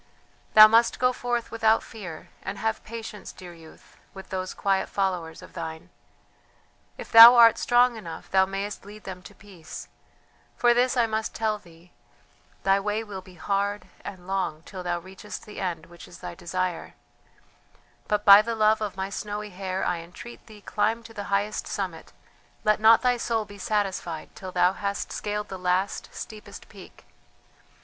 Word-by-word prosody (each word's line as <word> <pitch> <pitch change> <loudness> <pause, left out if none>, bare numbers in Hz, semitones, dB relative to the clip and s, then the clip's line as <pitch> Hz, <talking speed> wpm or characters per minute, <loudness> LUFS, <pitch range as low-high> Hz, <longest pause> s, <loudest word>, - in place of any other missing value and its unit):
"Thou 215 0 +11
must 230 +2 +3
go 250 0 +2
forth 240 -1 -3
without 225 -1 +2
fear; 180 -8 -9
and 200 - -6
have 220 0 -2
patience, 220 -2 -8
dear 180 -1 -12
youth, 165 -1 -17 0.2
with 190 - -10
those 185 0 -4
quiet 195 -1 0
followers 180 -5 -2
of - - -14
thine. 160 -1 -7 1.1
If - - -9
thou 230 +2 +11
art 230 -2 +7
strong 245 -1 +3
enough 170 -6 -9
thou 190 0 +4
mayest 195 +2 -5
lead 210 +2 -12
them 185 -1 -8
to 200 +2 -14
peace; 185 -7 -11 0.7
for 240 0 +4
this 250 +2 +1
I 240 - +4
must 220 0 -3
tell 215 -1 -1
thee: 170 -1 -19 0.7
thy 195 0 +3
way 210 +2 -2
will 200 -3 -8
be 185 0 -16
hard 200 +4 -2
and 185 -3 -9
long 185 -5 -2
till 185 0 -8
thou 175 -1 -2
reachest 190 +4 -10
the 210 - -9
end 170 -4 -3
which 170 0 -14
is - - -13
thy - - -7
desire; 180 0 -4 1.1
but 210 0 0
by 200 0 +10
the 230 +1 -3
love 215 0 +3
of 205 -2 -4
my 190 +1 -3
snowy 210 0 -5
hair 185 0 -3
I 175 -1 -1
entreat 180 +8 -12
thee 215 -2 -14
climb 220 +3 -1
to 225 0 -13
the 205 -2 -6
highest 200 +2 -1
summit, 190 -6 -5 0.5
let 215 0 +3
not 225 +2 +6
thy 250 -1 +3
soul 230 -2 -1
be 205 0 -13
satisfied 190 -6 -2
till 185 -1 -8
thou 180 +1 +3
hast 200 0 -4
scaled 210 0 -4
the 190 - -7
last, 185 +2 -1
steepest 215 -1 -10
peak. - - -15
200 Hz, 170 wpm, -26 LUFS, 185-220 Hz, 1.1 s, Thou